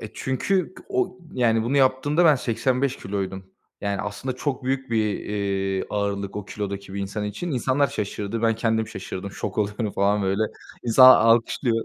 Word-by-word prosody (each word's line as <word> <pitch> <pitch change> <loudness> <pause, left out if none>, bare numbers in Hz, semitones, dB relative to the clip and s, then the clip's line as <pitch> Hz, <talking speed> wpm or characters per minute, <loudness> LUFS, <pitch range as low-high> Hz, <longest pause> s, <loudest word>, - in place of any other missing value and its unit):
E, 110 - -6
çünkü 180 +8 -1
o, 375 - -1
yani 115 -3 +2
bunu 125 +5 0
yaptığımda 140 +5 +3
ben 155 -3 +7
85 130 +2 0
kiloydum. 95 -1 -4 0.3
Yani 100 -1 -2
aslında 125 +6 -4
çok 130 -1 -3
büyük 135 -1 -2
bir, 110 -2 +2
iii, 95 -2 -2
ağırlık, 100 -1 -2
o 105 - -4
kilodaki 100 -1 -6
bir 100 - -3
insan 100 +2 -3
için. 105 - -4
İnsanlar 135 +1 +1
şaşırdı. 105 +2 -4
Ben 115 -1 +3
kendim 110 0 0
şaşırdım. 95 -1 -6
Şok - - -5
oluyorum 105 +1 -1
falan 100 +1 +2
böyle. 95 +2 +1 0.4
İnsanlar 130 +2 +8
alkışlıyor. 115 +1 +2
110 Hz, 160 wpm, -24 LUFS, 100-130 Hz, 0.4 s, İnsanlar